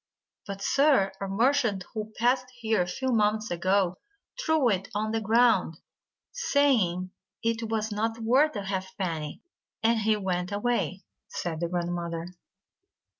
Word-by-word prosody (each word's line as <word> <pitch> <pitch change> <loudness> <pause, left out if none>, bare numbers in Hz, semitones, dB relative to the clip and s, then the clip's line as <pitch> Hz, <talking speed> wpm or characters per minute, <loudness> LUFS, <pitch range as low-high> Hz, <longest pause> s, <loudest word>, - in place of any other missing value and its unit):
"But, 195 0 -5
sir, 275 -9 +4
a 195 - -2
merchant 215 -2 +1
who 215 -1 -4
passed 250 +2 +2
here 220 -4 +1
a 175 - -1
few 260 +9 -2
mo 210 -3 +3
ments 215 -1 -5
ago, 185 +1 +1 0.4
threw 315 -5 +3
it 195 -2 -1
on 215 +1 0
the 225 0 0
ground, 220 -7 +3 0.5
saying 260 - +2 0.3
it 230 0 -1
was 220 -1 -1
not 225 +2 -1
worth 255 +6 +3
a 205 - -3
halfpenny, 185 -5 -4 0.4
and 225 0 +3
he 215 0 +2
went 180 -2 -2
away," 205 -2 -1 0.2
said 165 -3 -4
the 170 0 -1
grandmother. 170 -1 -3
210 Hz, 140 wpm, -27 LUFS, 185-230 Hz, 0.5 s, sir